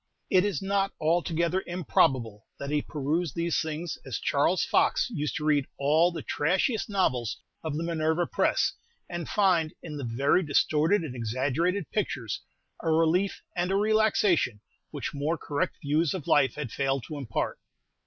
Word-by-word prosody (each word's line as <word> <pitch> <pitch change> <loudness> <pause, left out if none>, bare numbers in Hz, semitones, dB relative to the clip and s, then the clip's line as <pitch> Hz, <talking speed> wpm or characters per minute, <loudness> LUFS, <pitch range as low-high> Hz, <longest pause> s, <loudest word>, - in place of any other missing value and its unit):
It 185 -1 +5
is 200 -5 -1
not 195 0 0
altogether 170 +2 +1
improbable 130 - +1
that 140 +1 -5
he 150 0 +2
perused 155 +1 -2
these 170 0 0
things 160 +1 -4
as - - -4
Charles - - +1
Fox - - +2
used 150 0 -2
to 150 - -3
read 145 -3 +2
all 155 +5 +3
the 165 -3 -6
trashiest 190 - 0
novels 130 - 0 0.3
of 155 -2 -3
the 165 - -2
Minerva 165 0 0
Press, - - +1 0.3
and 175 -2 -5
find, 180 -6 +2
in 150 -3 -6
the 140 - -5
very 130 +9 +2
distorted 160 +4 +2
and 135 -6 -6
exaggerated 135 - -1
pictures, 130 - -2 0.4
a 165 - -1
relief 165 +5 +2
and 180 0 0
a - - +2
relaxation 205 - +2 0.3
which - - -5
more 150 +4 -1
correct 145 -1 -2
views 155 +4 +1
of 175 - -5
life 135 -3 +3
had 145 -6 -5
failed 135 -2 0
to 150 - -6
impart. 115 -5 -3
160 Hz, 160 wpm, -28 LUFS, 140-175 Hz, 0.4 s, It